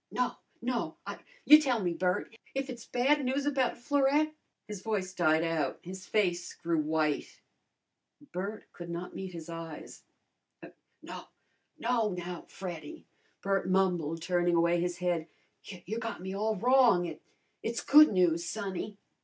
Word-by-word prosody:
"No! 250 -1 +1 0.3
No, 245 -1 -2
I - - -6
" - - -29
"You 300 +1 +10
tell 255 -6 +1
me, 175 -1 0
Bert! 180 +6 -1 0.2
If 270 0 -2
it's 240 -2 -9
bad 275 +4 +2
news 265 +2 0
about 270 -4 +1
Florette 285 +3 +2 0.2
" - - -53
His 210 -3 -6
voice 195 -3 -2
died 160 -3 +3
out. 165 -3 0
His 185 +1 -8
face 180 -4 0
grew 165 -1 0
white. 155 -1 -1 0.9
Bert 200 +4 -4
could 175 -1 -8
not 170 +1 -5
meet 190 -1 -5
his 165 -1 -7
eyes. 165 -2 -8 1.0
"No, - - -8 0.5
no, 230 -2 +1
now, 175 -1 -6
Freddy," 170 -6 -7 0.4
Bert 195 -2 0
mumbled, 175 -4 +1
turning 175 0 +2
away 170 +1 +3
his 175 0 -1
head. 175 -3 -1 0.4
"You 190 +3 -6
got 230 -1 -4
me 190 +1 -5
all 215 +2 0
wrong. 240 -4 +5
It 160 -3 -7 0.4
it's 230 +1 -2
good 305 +2 +8
news, 175 -3 +3
sonny." 200 +1 -4
185 Hz, 155 wpm, -31 LUFS, 170-235 Hz, 1.0 s, You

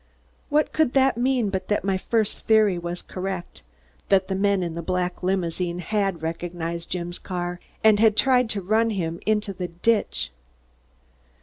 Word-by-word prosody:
What 300 +1 +2
could 315 -6 +2
that 270 -1 +4
mean 245 -3 +1
but 190 -1 -3
that 205 - 0
my 195 0 +1
first 215 +2 -1
theory 215 -5 +4
was 175 +1 -5
correct, 185 -1 -5 0.5
that 195 -1 +3
the - - 0
men 195 -1 +2
in 170 -2 -3
the 170 - -4
black 180 +1 -2
limousine 180 -1 -1
had 195 -2 -1
recognized 170 0 -4
Jim's 175 -1 -4
car 175 -1 -4 0.2
and 215 -2 +6
had 220 -1 +4
tried 250 -1 +4
to 205 -2 -1
run 220 +4 +2
him 170 -5 -2
into 210 -2 +1
the 180 -1 -4
ditch? 205 +6 0
190 Hz, 165 wpm, -24 LUFS, 175-215 Hz, 0.5 s, and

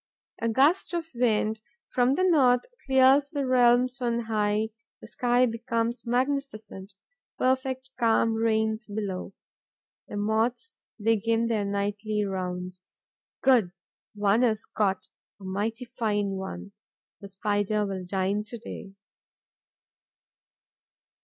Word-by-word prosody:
A 230 - +1
gust 290 +10 +3
of 335 -1 -2
wind 220 -2 +1 0.3
from 250 +1 +3
the 370 - +1
north 265 -9 +4 0.2
clears 265 +1 +5
the 285 -3 -2
realms 250 0 +3
on 235 -1 0
high; 215 -1 0 0.3
the - - -12
sky 245 0 +2
becomes 230 0 -2
magnificent; 240 -7 -2 0.4
perfect 260 0 0
calm 225 -1 +3
reigns 220 0 0
below. 200 -3 -4 0.7
The - - -6
Moths 225 - 0 0.3
begin 225 +1 +1
their 220 -3 0
nightly 205 +1 -1
rounds. 185 -1 -4 0.5
Good! 235 -9 +4 0.4
One 205 +2 +2
is 220 -3 +1
caught, 195 -3 -1 0.3
a - - -14
mighty 210 +6 -3
fine 210 -4 -1
one. 190 +1 -6 0.5
The 200 - -9
Spider 205 +1 0
will 190 -2 -4
dine 195 +3 -1
to 235 +3 -8
day. 205 -3 -9
225 Hz, 115 wpm, -27 LUFS, 205-250 Hz, 0.7 s, clears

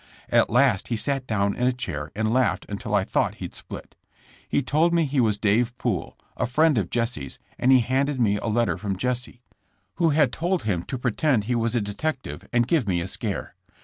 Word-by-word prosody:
At - - +4
last 120 -5 +3
he 115 - -1
sat 135 +2 -2
down 100 -2 +1
in 125 - +1
a - - +4
chair 80 - -5
and 110 +1 0
laughed 130 0 +1
until 100 0 -3
I 100 - +3
thought - - 0
he'd - - -7
split. - - -8 0.5
He 140 - +1
told 160 +7 +2
me 165 -2 +3
he 140 -1 0
was 110 -4 +2
Dave 115 +4 +1
Poole, 105 -9 -2 0.2
a - - -1
friend 150 +1 +3
of 90 -4 -2
Jesse 115 - -2
^s, - - -9 0.2
and 130 - +4
he 130 -1 +7
handed 135 +3 0
me' 105 -4 +3
a 115 - -4
letter 115 -3 +1
from 100 -1 -3
Jesse, 125 +2 -3 0.5
who 165 -2 +3
had 150 -2 +3
told 175 +2 -1
him 95 -6 0
to 130 - -4
pretend 125 0 +1
he 120 +4 -1
was 115 0 0
a 120 - +2
detective 130 +8 -4
and 120 -2 +2
give 150 -9 +1
me 90 -3 +1
a 85 - -3
scare. - - -3
120 Hz, 215 wpm, -25 LUFS, 105-135 Hz, 0.5 s, he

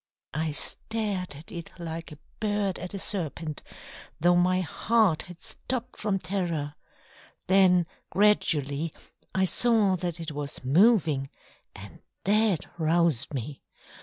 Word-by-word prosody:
I 155 +2 -1
stared 195 +3 +1
at 150 +4 -11
it 170 -2 -8
like 165 0 -6
a 150 - -10 0.2
bird 205 -3 -1
at 180 +3 -5
a - - -2
serpent, 165 -6 -3 0.6
though 175 +2 +4
my 185 +1 +3
heart 205 0 +2
had 175 -1 -11
stopped 250 +5 -5
from 205 -2 0
terror 170 -5 -2 0.7
then 185 -2 +5 0.2
gradually 160 -7 +1 0.4
I 190 0 +3
saw 215 -1 +3
that 175 -1 -3
it 165 -1 -5
was 145 -2 -6
moving, 155 - +4 0.5
and - - -10 0.2
that 210 -4 +2
roused 160 -5 +2
me. 135 +3 -5
175 Hz, 125 wpm, -27 LUFS, 155-200 Hz, 0.7 s, then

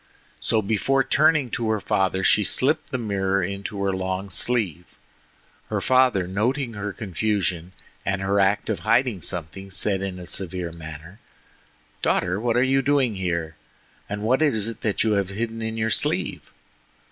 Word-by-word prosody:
So 110 -1 +1
before 125 +6 +2
turning 150 -3 +3
to 115 -2 -1
her 110 -1 +1
father 95 -1 0
she 105 - +4
slipped 150 +8 +1
the 130 - -2
mirror 100 -4 0
into 100 +2 -4
her 100 -1 +1
long 95 +1 -3
sleeve. 95 -6 +1 0.8
Her - - 0
father 130 -7 +3
noting 115 +7 -1
her 105 -1 -4
confusion, 95 -4 -2 0.3
and 95 0 -1
her 100 +1 +2
act 100 +1 +2
of 110 - -1
hiding 115 -5 +2
something, 90 +4 -4
said 95 0 +1
in 95 -2 -4
a 90 - -8
severe 90 -2 -3
manner: 80 +4 -10 0.8
"Daughter, 90 +2 +1
what 120 +1 +1
are 125 - +4
you 135 +1 +3
doing 135 -3 +2
here? 85 -4 -2 0.5
And 105 +1 -4
what 130 +6 +2
is 110 -10 +2
that 115 0 -6
that 105 -3 +1
you 110 - +2
have 100 -2 +1
hidden 115 +3 -4
in 110 0 -3
your 110 0 0
sleeve?" - - -1
100 Hz, 165 wpm, -24 LUFS, 95-115 Hz, 0.8 s, she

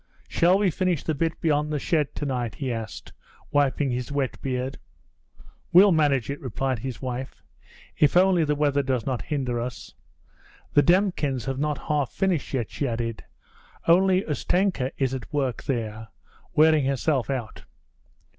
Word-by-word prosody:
'Shall 180 +3 +3
we 200 -3 +2
finish 180 -2 0
the 160 - -1
bit 165 +3 -1
beyond 150 -1 +1
the 150 - 0
shed 150 0 0
to 145 - -3
night?' 125 -5 -2
he 130 -4 -3
asked, 110 -1 -7 0.4
wiping 145 -1 +2
his 125 +2 -3
wet 140 -2 -2
beard. 130 0 -3 0.9
'We'll 190 +3 +7
manage 145 -7 +2
it,' 140 - -6
replied 130 0 -2
his 130 +2 -6
wife, 130 +1 -5 0.5
'if 150 +3 +4
only 185 -2 +4
the 150 -1 +1
weather 145 -1 +2
does 130 -4 -1
not 130 -3 -2
hinder 130 -5 -2
us. 125 +2 -7 0.8
The 145 - +6
Demkins 160 - +1
have 135 0 -3
not 150 0 0
half 145 -4 0
finished 185 -6 -1
yet,' 120 -5 -2
she 140 - -2
added. 115 -1 -3 0.6
'Only 185 +2 +4
Ustenka 165 -2 0
is 135 -2 0
at 130 -3 -6
work 135 -5 -2
there, 110 -4 -3 0.5
wearing 155 -2 +5
herself 135 -1 0
out.' 125 -5 -4
140 Hz, 155 wpm, -25 LUFS, 130-155 Hz, 0.9 s, We'll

